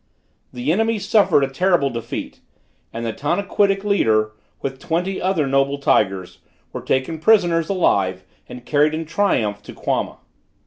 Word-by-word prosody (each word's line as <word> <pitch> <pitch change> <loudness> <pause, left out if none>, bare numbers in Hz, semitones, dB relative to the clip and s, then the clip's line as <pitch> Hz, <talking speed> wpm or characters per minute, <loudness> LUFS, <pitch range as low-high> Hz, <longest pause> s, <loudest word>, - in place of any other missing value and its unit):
The 125 +4 -2
enemy 225 +5 +1
suffered 200 -7 +3
a - - +1
terrible 155 0 +1
defeat 115 -1 -6 0.5
and 115 +1 -5
the 115 - -2
Tanaquitic 195 - 0
leader, 110 - +2 0.3
with 135 -1 -5
twenty 180 +5 -2
other 185 -5 +1
noble 135 +1 +1
tigers, 95 -9 0 0.3
were - - -5
taken 135 +5 -1
prisoners 170 -3 +3
alive 95 - +1 0.3
and 125 0 -10
carried 150 +1 +2
in 160 +1 -4
triumph 115 - 0
to - - -11
Quama. - - -2
150 Hz, 140 wpm, -20 LUFS, 120-190 Hz, 0.5 s, suffered